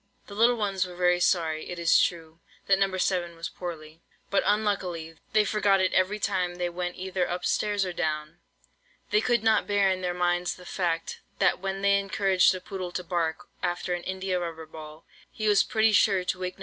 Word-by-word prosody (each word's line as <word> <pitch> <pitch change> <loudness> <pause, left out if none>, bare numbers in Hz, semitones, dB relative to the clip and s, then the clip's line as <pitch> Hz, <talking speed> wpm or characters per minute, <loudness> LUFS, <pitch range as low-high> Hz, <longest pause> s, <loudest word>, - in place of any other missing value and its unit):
The 200 - -11
little 230 +4 +4
ones 195 -4 -1
were 180 - -10
very 180 0 +2
sorry, 160 -3 +1
it 180 - -5
is 170 -1 +4
true, 165 -1 -2 0.3
that 195 -1 +3
No. 195 -1 +1
7 175 -2 0
was 165 0 -5
poorly; 160 -2 -8 0.3
but, 200 - +3
unluckily, 185 -6 -1
they 215 -1 +4
forgot 205 -2 +2
it 185 0 +1
every 190 +3 +2
time 185 -4 -1
they 175 0 -2
went 175 0 -4
either 185 -1 -2
up 180 0 -3
stairs 205 -2 +1
or 180 - -4
down. 155 -1 -3 0.7
They 425 - +4
could 240 -3 +1
not 220 -1 +3
bear 200 -1 +3
in 185 0 -2
their 180 -1 -2
minds 175 0 0
the 180 - -14
fact, 170 -3 -2 0.2
that - - +2
when 195 +1 -4
they 200 0 +4
encouraged 195 -2 +3
the 185 - -3
poodle 185 -1 -6
to 180 - -3
bark 165 -2 -2
after 175 0 -2
an 175 - -3
India 190 0 -2
rubber 165 -2 -5
ball, 155 0 -11 0.2
he 215 - -3
was 205 -1 +5
pretty 220 0 +2
sure 195 -3 +3
to 185 0 -2
wake 185 0 -4
No. - - -23
180 Hz, 205 wpm, -27 LUFS, 175-195 Hz, 0.7 s, was